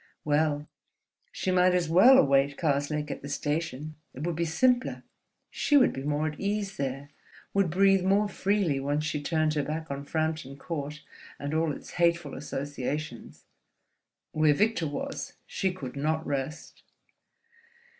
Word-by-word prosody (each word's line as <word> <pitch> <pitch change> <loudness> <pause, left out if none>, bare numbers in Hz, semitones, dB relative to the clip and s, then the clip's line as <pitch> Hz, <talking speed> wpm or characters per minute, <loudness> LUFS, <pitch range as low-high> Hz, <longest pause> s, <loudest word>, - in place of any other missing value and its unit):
Well: 150 0 +1 0.6
she 190 - -2
might 180 0 +4
as 175 -2 +1
well 195 +11 +7
await 140 - +3
Karslake 150 -1 0
at - - -6
the 140 - -7
station. 150 0 -2 0.2
It 135 - -6
would 170 -2 -1
be 170 +1 0
simpler, 250 +10 +1 0.5
she 290 - +3
would 260 - +5
be 135 - -5
more 150 +2 0
at 150 -1 -4
ease 200 -1 -2
there, 135 0 -4 0.4
would 195 -3 +2
breathe 195 +2 +4
more 200 +2 +3
freely 195 -8 0
once 145 +2 -1
she 155 -1 -2
turned 155 0 +1
her 150 - +1
back 155 +2 -4
on 140 0 -4
Frampton 155 -3 -2
Court 150 -1 -5 0.3
and 145 +1 -4
all 160 0 +1
its - - -8
hateful 170 -4 +2
associations. 145 -1 -5 0.9
Where 155 -1 +3
Victor 210 -3 +1
was, 145 - -5
she 190 - -1
could 140 -9 -7
not 155 +3 -1
rest. 140 +2 -4
155 Hz, 150 wpm, -28 LUFS, 145-180 Hz, 0.9 s, well